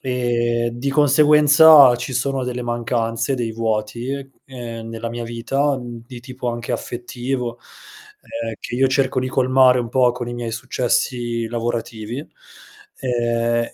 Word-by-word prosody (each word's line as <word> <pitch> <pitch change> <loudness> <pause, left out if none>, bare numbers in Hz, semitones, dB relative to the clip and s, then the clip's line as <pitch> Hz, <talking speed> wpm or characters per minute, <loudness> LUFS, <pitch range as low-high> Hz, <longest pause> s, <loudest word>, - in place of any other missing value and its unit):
Ehm, 120 -2 0
di 120 +4 -3
conseguenza 150 -1 +6
ci 125 +2 -5
sono 135 +1 -1
delle 125 0 -4
mancanze, 120 0 -1
dei 120 -3 -2
vuoti, 115 +3 -2 0.3
ehm, 115 -3 -8
nella 115 0 -5
mia 120 0 -5
vita, 135 +5 -1
mhmm, 120 -2 -8
di 125 -1 -10
tipo 130 0 -6
anche 120 0 -4
affettivo, 120 +1 -4 0.9
ehm, 115 - -4
che 120 - -6
io 135 +1 +3
cerco 130 0 +1
di 130 - -2
colmare 130 -1 +4
un 120 - -4
po' 125 0 +3
con 120 -1 -6
i 120 - -5
miei 120 -1 -5
successi 120 -1 -1
lavorativi, 115 0 -4
ehm, 125 - -4
120 Hz, 140 wpm, -20 LUFS, 120-130 Hz, 0.9 s, conseguenza